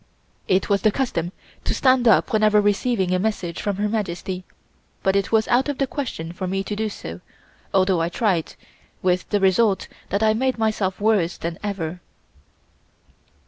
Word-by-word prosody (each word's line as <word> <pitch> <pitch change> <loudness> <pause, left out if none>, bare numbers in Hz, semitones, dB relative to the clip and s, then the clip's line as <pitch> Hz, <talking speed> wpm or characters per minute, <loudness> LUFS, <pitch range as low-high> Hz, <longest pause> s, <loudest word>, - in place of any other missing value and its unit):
It 185 0 +2
was 200 -1 +2
the 215 - +4
custom 180 -10 -1 0.3
to - - -1
stand 255 -2 +3
up 225 - +4
whenever 215 -1 +4
receiving 205 -2 +1
a 185 - +2
message 185 -5 -2
from 205 -1 -1
Her 205 +2 0
Majesty, 190 -3 -3 0.6
but 190 0 +2
it 200 -1 0
was 220 -1 +3
out 260 +4 +3
of 285 - -2
the 275 - +1
question 245 - -5
for 185 +2 -5
me 195 +1 -1
to 210 - -4
do 215 +1 -1
so, 85 - -8 0.5
although 185 -2 +3
I 165 - 0
tried, 180 -4 0 0.5
with 180 0 +1
the 205 - +2
result 195 +1 +3 0.2
that 200 +2 0
I 215 0 +4
made 260 +3 0
myself 215 -4 0
worse 205 -5 +2
than 165 0 -5
ever. 180 -4 -4
200 Hz, 175 wpm, -23 LUFS, 180-220 Hz, 0.6 s, the